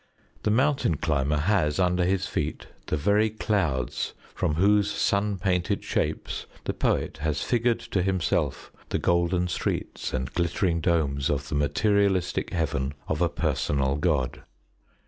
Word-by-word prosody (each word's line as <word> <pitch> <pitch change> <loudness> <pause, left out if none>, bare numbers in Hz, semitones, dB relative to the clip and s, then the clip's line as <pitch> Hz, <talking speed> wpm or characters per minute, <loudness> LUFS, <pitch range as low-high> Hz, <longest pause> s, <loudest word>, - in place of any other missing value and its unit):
The - - 0
mountain 130 - +2
climber 75 -1 +1
has 75 -2 +1
under 90 -1 +2
his 95 0 +1
feet - - -3 0.2
the - - 0
very 105 +8 +3
clouds 95 - -1 0.2
from 75 - 0
whose 100 +4 +4
sun 100 0 +1
painted 90 -1 0
shapes - - -2 0.2
the - - -2
poet - - 0
has 75 -1 -1
figured 120 -1 +1
to 95 - -1
himself 95 -2 0 0.2
the - - 0
golden 85 +1 +1
streets 85 - -3
and 65 +1 -3
glittering 85 0 0
domes 75 -5 +1
of 70 -1 -1
the - - -5
materialistic 95 +5 +1
Heaven 70 -4 -1
of 80 +1 -1
a 85 - +3
personal 70 -2 0
God. 75 -6 0
85 Hz, 140 wpm, -26 LUFS, 75-100 Hz, 0.2 s, whose